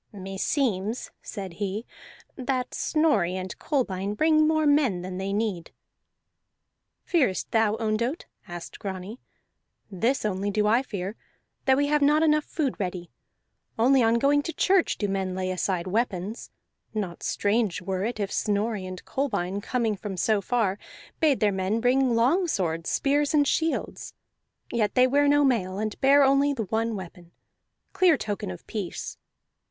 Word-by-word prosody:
"Meseems," 200 +3 -2
said 195 -5 -7
he, 205 +3 -2 0.5
"that 255 -1 -2
Snorri 255 - +1
and 185 0 -5
Kolbein 205 -8 -1
bring 310 +4 +4
more 315 -1 +2
men 275 -12 +2
than 185 0 -5
they 195 +1 -3
need." 200 -5 -2 1.4
"Fearest 260 - +1
thou, 225 -2 +3
Ondott?" 230 +7 -1 0.2
asked 175 -1 -8
Grani. 195 +3 -6 0.7
"This 230 +7 0
only 200 0 -1
do 210 +1 +1
I 225 +4 +4
fear, 200 -5 -5 0.5
that 265 -1 +4
we 285 - +2
have 295 0 +1
not 300 +2 +4
enough 305 -1 +3
food 290 -6 -2
ready. 180 -3 -4 0.7
Only 255 +4 +4
on 230 0 +3
going 280 +4 +3
to 330 +3 -5
church 380 -2 +2
do 205 - -1
men 190 -1 -2
lay 185 0 -2
aside 180 -1 -1
weapons; 205 0 -2 0.5
not 190 -5 -3
strange 205 -2 0
were 185 +1 -3
it 230 +1 -3
if 200 -1 -2
Snorri 210 -1 -1
and 185 0 -8
Kolbein, 200 -8 -2
coming 230 -2 -1
from 195 -1 -6
so 210 +2 +2
far, 210 -2 0 0.4
bade 295 -6 +3
their 210 -1 +4
men 190 +3 -1
bring 250 +1 +2
longswords, 230 - +1
spears, 290 +2 +1
and 290 -1 +4
shields. 325 +3 -2 0.6
Yet 220 -3 0
they 255 - +6
wear 285 +3 +3
no 290 0 +4
mail, 195 -8 +1
and 215 0 -4
bear 280 +1 +6
only 275 +1 +3
the 235 -5 -2
one 225 +3 -1
weapon 175 -2 -10 0.6
clear 355 -6 +4
token 205 - -4
of 90 - -8
peace. - - -5
220 Hz, 150 wpm, -26 LUFS, 190-275 Hz, 1.4 s, they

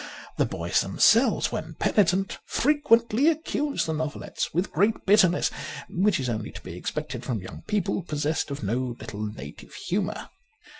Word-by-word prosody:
The - - +2
boys - - 0
them - - -5
selves, - - +5
when - - -5
penitent, 195 -1 +2
frequently 260 -3 +3
accuse 300 -2 0
the 160 - -1
novelettes 155 -1 -3
with 180 +4 -1
great 205 +8 +1
bitterness, 190 -3 +4 0.4
which 195 0 +2
is 130 - -2
only 110 -3 -2
to - - -8
be 90 - -8
expected 125 - -4
from 120 -5 -2
young 95 - -9
people 205 -2 0
possessed 155 -1 -1
of 140 -4 -5
no 120 +4 -1
little 105 0 -6
native 75 -9 -8
humour. 190 +1 -3
170 Hz, 155 wpm, -26 LUFS, 125-210 Hz, 0.4 s, selves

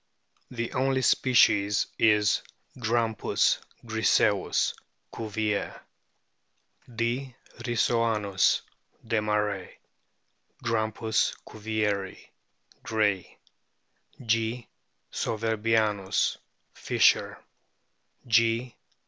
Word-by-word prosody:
The 115 -2 -4
only 130 0 +1
species 105 -7 +3
is 105 -1 +3 0.3
Grampiis 115 -2 +1 0.3
griseiis, 110 -3 +2 0.4
Cuvier.* 110 -2 -2 1.2
D. 120 +3 -2 0.2
rissoanus, 115 -5 +1 0.4
Desmarest; 105 -3 -1 0.9
Grampus 110 -1 0
cuvieri, 105 -3 -2 0.6
Gray; 105 -5 -1 0.9
G. 115 +1 0 0.5
souverbianus, 110 -3 0 0.4
Fischer; - - +2 0.9
G. 115 +1 +2
110 Hz, 55 wpm, -27 LUFS, 105-115 Hz, 1.2 s, species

